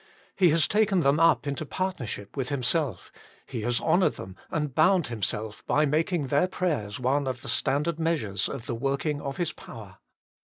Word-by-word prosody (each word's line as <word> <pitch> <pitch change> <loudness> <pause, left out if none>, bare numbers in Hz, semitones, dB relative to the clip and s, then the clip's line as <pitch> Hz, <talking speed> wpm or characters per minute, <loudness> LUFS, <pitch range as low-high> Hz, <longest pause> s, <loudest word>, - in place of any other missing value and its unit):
He 185 -3 +5
has 160 +1 +3
taken 210 -3 +2
them 140 +1 +3
up 165 -2 +4
into 140 +1 -3
partnership 135 - -4
with 135 -2 -2
Himself; 140 - -1 0.3
He 120 - -5
has 120 +2 0
honoured 180 +1 +2
them, 95 0 -9
and 150 -4 -2
bound 170 +3 +4
Himself, 110 0 -3
by 150 - +3
making 155 0 0
their 145 +6 +3
prayers 145 - -2
one 135 +3 +1
of 125 -1 -4
the - - -7
standard 145 +6 0
measures 125 - 0
of 115 - -6
the - - -3
working 140 +4 -1
of 140 -1 -5
His 175 -3 -1
power. 100 -5 -11
140 Hz, 180 wpm, -27 LUFS, 120-165 Hz, 0.3 s, He